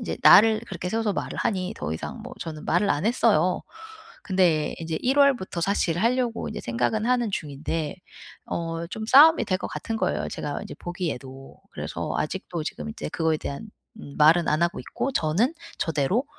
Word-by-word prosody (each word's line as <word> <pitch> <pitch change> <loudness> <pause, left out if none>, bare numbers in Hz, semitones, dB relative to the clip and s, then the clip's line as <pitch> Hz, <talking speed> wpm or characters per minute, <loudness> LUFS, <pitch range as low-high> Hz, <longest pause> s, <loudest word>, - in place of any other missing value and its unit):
인제 - - -4
날을 220 0 +7
그렇게 180 -2 -5
세워서 220 -1 0
말을 - - -4
하니 185 -4 -1
더 75 - -3
이상 80 - -6
뭐 - - -9
저는 155 -2 -6
말을 180 +4 +2
안 145 +5 0
했어요. 205 -7 +2 0.6
근데 180 -6 +2
인제 160 -1 -3
1 265 +3 +1
월부터 265 -11 +3
사실 175 -4 0
하려고 240 +1 0
인제 - - -5
생각은 215 - -1
하는 245 -3 +1
중인데 155 +2 -3 0.5
어 165 0 -3
좀 220 +4 -5
싸움이 295 +2 +7
될 185 - +1
것 - - -5
같은 225 - -4
거예요 - - -1
제가 - - -4
인제 - - -8
보기에도. 135 -7 -6
그래서 - - -4
아직도 170 0 -3
지금 75 - -5
인제 75 0 -6
그거에 160 -1 +1
대한 140 +11 -6 0.3
음 140 - -10
말은 160 +3 +5
안 155 +3 +2
하고 170 - 0
있고 275 - -3
저는 195 - +1 0.2
저대로 165 - 0
180 Hz, 350 characters per minute, -25 LUFS, 155-220 Hz, 0.6 s, 날을